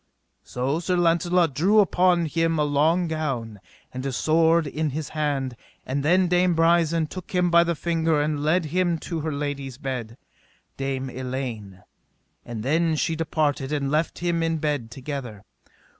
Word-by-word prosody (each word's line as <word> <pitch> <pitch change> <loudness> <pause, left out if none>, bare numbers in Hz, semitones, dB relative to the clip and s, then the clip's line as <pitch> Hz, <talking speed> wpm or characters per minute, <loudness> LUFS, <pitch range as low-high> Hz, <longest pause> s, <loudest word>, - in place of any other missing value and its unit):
So 135 +5 -2
Sir 180 +1 0
Launcelot 170 -1 +2
threw 195 +9 +4
upon 180 -3 +3
him 165 +1 0
a 150 - +2
long 155 +5 +2
gown, 135 -10 -3 0.3
and 130 0 -5
his 135 -2 -2
sword 160 +1 +3
in 155 +2 -2
his 155 -3 -4
hand; 140 -5 -2 0.3
and 135 +2 -2
then 180 +5 +3
Dame 180 0 +2
Brisen 165 0 +3
took 185 +4 -9
him 180 -1 +2
by 170 0 +6
the 170 0 -1
finger 165 -1 0
and 150 0 -1
led 160 +3 +2
him 180 -2 +2
to 165 +1 -5
her 155 +1 -3
lady's 140 -3 -4
bed, 125 -4 -5 0.6
Dame 135 -1 -3
Elaine; 125 -7 -5 0.6
and 115 -3 -6
then 160 +4 +1
she 160 +2 0
departed 150 -3 -1
and 140 -2 -1
left 155 +2 0
them 170 -1 0
in 165 0 0
bed 145 -6 -2
together. 125 -5 -7
155 Hz, 160 wpm, -24 LUFS, 135-170 Hz, 0.6 s, by